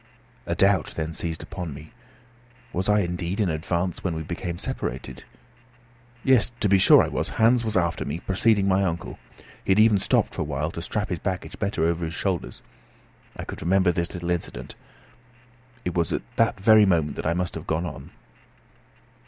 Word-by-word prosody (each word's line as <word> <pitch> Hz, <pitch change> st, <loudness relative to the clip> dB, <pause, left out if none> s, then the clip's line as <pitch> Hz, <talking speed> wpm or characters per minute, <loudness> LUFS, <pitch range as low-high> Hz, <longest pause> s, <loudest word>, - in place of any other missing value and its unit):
A -, -, 0 dB
doubt 95 Hz, -4 st, +2 dB
then 80 Hz, 0 st, -2 dB
seized 80 Hz, -1 st, -2 dB
upon 85 Hz, -6 st, -6 dB
me. 75 Hz, +2 st, -11 dB, 0.8 s
Was 95 Hz, +3 st, -1 dB
I 105 Hz, 0 st, +4 dB
indeed 90 Hz, +2 st, -3 dB
in 100 Hz, -4 st, +2 dB
advance 85 Hz, +3 st, -2 dB
when 90 Hz, -3 st, -1 dB
we 80 Hz, -, -4 dB
became 85 Hz, +1 st, -4 dB
separated? 65 Hz, -5 st, -5 dB, 1.0 s
Yes, 130 Hz, -4 st, +4 dB
to 110 Hz, -, +2 dB
be 100 Hz, -1 st, +4 dB
sure -, -, +7 dB
I -, -, -1 dB
was. -, -, -2 dB
Hans 115 Hz, +2 st, +4 dB
was 110 Hz, -3 st, 0 dB
after 85 Hz, -2 st, 0 dB
me, 75 Hz, +4 st, -4 dB
preceding 100 Hz, +2 st, +2 dB
my 95 Hz, +1 st, +3 dB
uncle. 85 Hz, -2 st, -3 dB, 0.4 s
He -, -, -10 dB
had 95 Hz, +2 st, +5 dB
even 110 Hz, -2 st, +5 dB
stopped -, -, +1 dB
for -, -, -4 dB
a -, -, +1 dB
while 75 Hz, +2 st, -2 dB
to 85 Hz, -, -6 dB
strap 105 Hz, +4 st, -3 dB
his 90 Hz, -, -2 dB
baggage 95 Hz, -2 st, -4 dB
better 100 Hz, -5 st, -1 dB
over 85 Hz, +1 st, +1 dB
his 80 Hz, 0 st, -4 dB
shoulders. 95 Hz, -1 st, -3 dB, 0.7 s
I -, -, -5 dB
could -, -, -7 dB
remember 95 Hz, +1 st, +3 dB
this 85 Hz, 0 st, -2 dB
little 85 Hz, 0 st, -3 dB
incident. 85 Hz, -1 st, -4 dB, 1.1 s
It 90 Hz, -, -1 dB
was 85 Hz, -3 st, 0 dB
at -, -, -2 dB
that 115 Hz, -3 st, +2 dB
very 110 Hz, +1 st, +6 dB
moment 80 Hz, -5 st, +1 dB
that -, -, -2 dB
I 85 Hz, -, +1 dB
must 90 Hz, 0 st, -2 dB
have -, -, -7 dB
gone 80 Hz, +2 st, 0 dB
on. 85 Hz, -, -7 dB
90 Hz, 190 wpm, -25 LUFS, 85-100 Hz, 1.1 s, sure